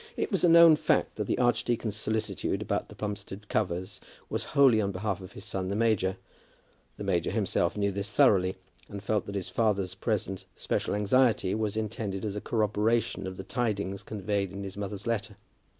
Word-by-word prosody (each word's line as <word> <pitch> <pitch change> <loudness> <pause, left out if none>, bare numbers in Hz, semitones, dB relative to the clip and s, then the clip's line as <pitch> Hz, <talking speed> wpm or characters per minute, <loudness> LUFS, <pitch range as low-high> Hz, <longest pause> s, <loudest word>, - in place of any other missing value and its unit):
It - - -1
was 195 - +1
a 175 - +6
known 165 -2 +8
fact - - +1
that - - -1
the - - 0
archdeacon's 120 -3 +1
solicitude 110 0 -1
about - - -2
the - - -11
Plumstead 105 -1 -6
covers 95 0 -2 0.3
was - - -1
wholly 135 -6 +4
on 100 -1 -1
behalf 100 0 -3
of 95 +1 -10
his 100 - -9
son 95 -3 -3
the 100 - -1
major. 105 -4 +1 0.8
The - - -5
major 90 -4 +1
himself 100 -3 0
knew 100 -1 +1
this 100 +1 -4
thoroughly, 100 -8 +4 0.3
and 100 -1 -7
felt 105 0 0
that 100 - -5
his 95 -3 -3
father's 100 -5 +1
present 95 0 -2
special - - -1
anxiety 105 -1 +3
was 110 -1 -1
intended 105 -2 -3
as 105 -1 -3
a 105 - -3
corroboration 110 -1 0
of 95 0 -6
the - - -6
tidings 100 -5 -2
conveyed 100 -2 -2
in 100 +1 -6
his 95 -1 -7
mother's 100 0 -5
letter. 115 -3 -2
105 Hz, 185 wpm, -29 LUFS, 95-110 Hz, 0.8 s, known